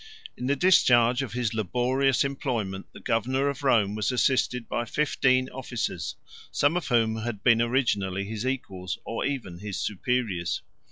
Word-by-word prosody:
108 -, -, -14 dB
In 125 Hz, -, -2 dB
the 140 Hz, -, +2 dB
discharge 125 Hz, -7 st, +4 dB
of 135 Hz, -4 st, -5 dB
his 120 Hz, -3 st, -1 dB
laborious 125 Hz, +6 st, +1 dB
employment, 120 Hz, -8 st, -3 dB
the -, -, -12 dB
governor 130 Hz, +5 st, 0 dB
of 140 Hz, +2 st, -5 dB
Rome 110 Hz, -7 st, +3 dB
was 105 Hz, +3 st, -1 dB
assisted 125 Hz, -1 st, +1 dB
by 120 Hz, -, -1 dB
fifteen 130 Hz, 0 st, +1 dB
officers, 125 Hz, -3 st, -4 dB, 0.4 s
some 145 Hz, +4 st, +2 dB
of 180 Hz, -4 st, -2 dB
whom 115 Hz, -3 st, +2 dB
had 110 Hz, -2 st, -5 dB
been 115 Hz, -2 st, +5 dB
originally 105 Hz, -6 st, 0 dB
his 110 Hz, +1 st, -5 dB
equals, 95 Hz, -9 st, -3 dB
or 115 Hz, -, -3 dB
even 115 Hz, -12 st, -4 dB
his 100 Hz, -1 st, -5 dB
superiors. 105 Hz, -4 st, -1 dB
120 Hz, 160 wpm, -26 LUFS, 105-130 Hz, 0.4 s, been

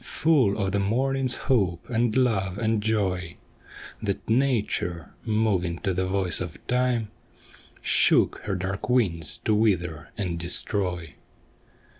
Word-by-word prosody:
Full 140 Hz, -11 st, +2 dB
of 95 Hz, -3 st, -1 dB
the 100 Hz, -, 0 dB
morning's 130 Hz, +5 st, 0 dB
hope, 95 Hz, -10 st, +1 dB
and 115 Hz, -1 st, 0 dB
love 100 Hz, -7 st, +1 dB
and 110 Hz, -1 st, 0 dB
joy. 95 Hz, -6 st, -1 dB, 0.6 s
That 100 Hz, -3 st, -3 dB
Nature, 110 Hz, -, 0 dB
moving 100 Hz, -6 st, 0 dB
to 95 Hz, -3 st, 0 dB
the 95 Hz, +1 st, -1 dB
voice 95 Hz, -3 st, -1 dB
of 85 Hz, -4 st, -5 dB
Time, 125 Hz, -3 st, 0 dB, 0.7 s
Shook -, -, +3 dB
her 100 Hz, -2 st, -1 dB
dark 95 Hz, +4 st, -4 dB
wings 90 Hz, -, +2 dB
to 110 Hz, -, +3 dB
wither 90 Hz, -7 st, 0 dB
and 90 Hz, -5 st, -2 dB
destroy. 90 Hz, -2 st, 0 dB
100 Hz, 125 wpm, -25 LUFS, 90-115 Hz, 0.7 s, Shook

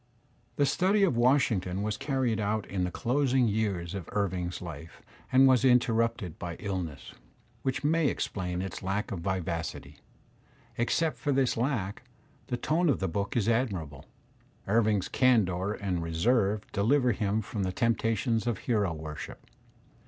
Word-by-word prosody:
The 145 Hz, -, +3 dB
study 190 Hz, +8 st, +2 dB
of 180 Hz, -10 st, +3 dB
Washington 115 Hz, -7 st, +2 dB
was 105 Hz, 0 st, -1 dB
carried 130 Hz, -5 st, -1 dB
on 105 Hz, 0 st, -1 dB
in 95 Hz, -2 st, -2 dB
the -, -, -2 dB
closing 130 Hz, +4 st, +1 dB
years 100 Hz, -5 st, -1 dB
of 95 Hz, -4 st, -6 dB
Irving*s 90 Hz, -3 st, -1 dB
life 85 Hz, -2 st, -9 dB, 0.3 s
and 130 Hz, +1 st, +6 dB
was 130 Hz, -1 st, +4 dB
interrupted 115 Hz, -7 st, +2 dB
by 85 Hz, -1 st, -5 dB
illness, 90 Hz, -8 st, -5 dB, 0.5 s
which 130 Hz, +2 st, -2 dB
may 160 Hz, +1 st, +3 dB
explain 90 Hz, -7 st, -2 dB
its 95 Hz, -4 st, -6 dB
lack 100 Hz, +2 st, -2 dB
of 95 Hz, -, -3 dB
vivacity. 85 Hz, -2 st, -4 dB, 0.8 s
Except 155 Hz, +7 st, 0 dB
for 145 Hz, -, 0 dB
this 135 Hz, -2 st, +2 dB
lack, 115 Hz, -5 st, -1 dB, 0.5 s
the 125 Hz, -, -2 dB
tone 165 Hz, +6 st, +1 dB
of 135 Hz, -, +3 dB
the 95 Hz, -, -1 dB
book 100 Hz, +6 st, -2 dB
is 110 Hz, -3 st, +1 dB
admirable. 95 Hz, -, -1 dB, 0.6 s
Irving's 105 Hz, -2 st, +2 dB
candour 105 Hz, -6 st, +2 dB
and 95 Hz, -4 st, -2 dB
reserve 100 Hz, +5 st, +1 dB
deliver 125 Hz, +5 st, +3 dB
him 105 Hz, 0 st, 0 dB
from 105 Hz, +1 st, -4 dB
the 95 Hz, -1 st, 0 dB
temptations 115 Hz, +1 st, 0 dB
of 115 Hz, -4 st, 0 dB
hero 105 Hz, -7 st, 0 dB
worship. 75 Hz, -1 st, -8 dB
105 Hz, 145 wpm, -29 LUFS, 95-125 Hz, 0.8 s, and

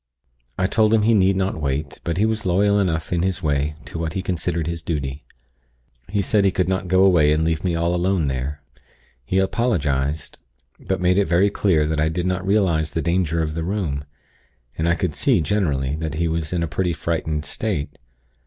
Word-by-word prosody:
"I 95 Hz, -, +1 dB
told 110 Hz, +3 st, +3 dB
him 110 Hz, -, +2 dB
he 115 Hz, +2 st, +4 dB
need 95 Hz, -2 st, +4 dB
not 95 Hz, -4 st, -1 dB
wait; 70 Hz, +1 st, -3 dB
but 85 Hz, 0 st, -2 dB
he 105 Hz, -, +3 dB
was 110 Hz, 0 st, -1 dB
loyal 100 Hz, +3 st, +3 dB
enough 85 Hz, -4 st, -1 dB
in 85 Hz, -, +1 dB
his 95 Hz, -1 st, -1 dB
way 75 Hz, 0 st, 0 dB
to 80 Hz, -, -6 dB
what 80 Hz, -1 st, -2 dB
he 95 Hz, -, -3 dB
considered 85 Hz, -3 st, -2 dB
his 85 Hz, 0 st, -4 dB
duty. 70 Hz, -3 st, -4 dB, 0.9 s
He 100 Hz, 0 st, 0 dB
said 105 Hz, +2 st, +2 dB
he 100 Hz, -, +4 dB
could 90 Hz, 0 st, 0 dB
not 95 Hz, 0 st, -1 dB
go 95 Hz, +1 st, +4 dB
away 85 Hz, -6 st, +5 dB
and 75 Hz, +1 st, +2 dB
leave 80 Hz, 0 st, 0 dB
me 90 Hz, -3 st, 0 dB
all 85 Hz, +1 st, 0 dB
alone 90 Hz, -2 st, +1 dB
there. 70 Hz, +2 st, -3 dB, 0.6 s
He 95 Hz, -, -1 dB
apologized; 80 Hz, -, 0 dB, 0.4 s
but -, -, -3 dB
made 90 Hz, +2 st, +3 dB
it 100 Hz, -, +3 dB
very 90 Hz, +5 st, +3 dB
clear 85 Hz, -8 st, +2 dB
that 80 Hz, 0 st, -1 dB
I 80 Hz, -, +2 dB
did 85 Hz, +2 st, -2 dB
not 90 Hz, 0 st, -1 dB
realize 90 Hz, -7 st, +1 dB
the 80 Hz, -, -1 dB
danger 85 Hz, -2 st, +1 dB
of 75 Hz, -1 st, -3 dB
the 80 Hz, +1 st, -3 dB
room; 85 Hz, -7 st, -2 dB, 0.7 s
and 80 Hz, +2 st, 0 dB
I 85 Hz, -, +3 dB
could 90 Hz, -4 st, -2 dB
see, 125 Hz, -, +2 dB
generally, 75 Hz, -7 st, 0 dB
that 80 Hz, -1 st, -4 dB
he 85 Hz, +2 st, 0 dB
was 80 Hz, -1 st, -2 dB
in 90 Hz, -2 st, 0 dB
a -, -, -1 dB
pretty 90 Hz, +2 st, -1 dB
frightened 80 Hz, -1 st, -2 dB
state. 75 Hz, -10 st, -3 dB
85 Hz, 210 wpm, -22 LUFS, 75-95 Hz, 0.9 s, away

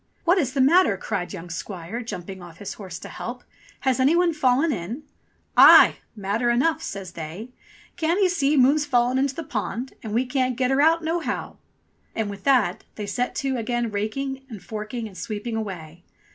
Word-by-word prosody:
"What 355 Hz, +3 st, +4 dB
is 265 Hz, -6 st, -1 dB
the 275 Hz, -, +2 dB
matter?" 285 Hz, -, +5 dB
cried 190 Hz, -3 st, -3 dB
young 175 Hz, -2 st, -8 dB
squire, 185 Hz, +5 st, -5 dB
jumping 190 Hz, -4 st, -7 dB
off 170 Hz, -2 st, -12 dB
his 200 Hz, 0 st, -6 dB
horse 185 Hz, -5 st, -8 dB
to -, -, -9 dB
help. 245 Hz, +1 st, -7 dB, 0.4 s
"Has 265 Hz, -2 st, +1 dB
any 275 Hz, +6 st, +4 dB
one 350 Hz, -1 st, +3 dB
fallen 280 Hz, +2 st, +2 dB
in 220 Hz, -, -5 dB, 0.3 s
?" -, -, -41 dB, 0.2 s
"Aye! -, -, +9 dB, 0.2 s
Matter 210 Hz, +4 st, -1 dB
enough," 315 Hz, +7 st, +2 dB
says 195 Hz, -, -6 dB
they. 170 Hz, +9 st, -7 dB, 0.5 s
"Can't 335 Hz, +3 st, +1 dB
ee 390 Hz, -, +5 dB
see 305 Hz, -5 st, +1 dB
moon's 280 Hz, +4 st, +5 dB
fallen 250 Hz, -2 st, +2 dB
into 270 Hz, 0 st, 0 dB
the 330 Hz, -, -4 dB
pond, 245 Hz, 0 st, -4 dB
an' 220 Hz, -, -6 dB
we 240 Hz, +3 st, +2 dB
can't 255 Hz, -1 st, 0 dB
get 255 Hz, 0 st, +1 dB
her 270 Hz, +1 st, +3 dB
out 325 Hz, +2 st, +4 dB
nohow 330 Hz, +2 st, -3 dB, 0.3 s
.?" -, -, -41 dB
And 215 Hz, -2 st, -2 dB
with 200 Hz, -1 st, -10 dB
that 245 Hz, -10 st, +2 dB
they 210 Hz, -, -5 dB
set 245 Hz, +5 st, -2 dB
to 265 Hz, -1 st, 0 dB
again 240 Hz, 0 st, -1 dB
raking, 265 Hz, +6 st, -3 dB
and 220 Hz, -4 st, -8 dB
forking, 215 Hz, +3 st, -5 dB
and 200 Hz, -, -13 dB
sweeping 215 Hz, +3 st, -4 dB
away. 175 Hz, -6 st, -6 dB
240 Hz, 195 wpm, -24 LUFS, 205-275 Hz, 0.5 s, Aye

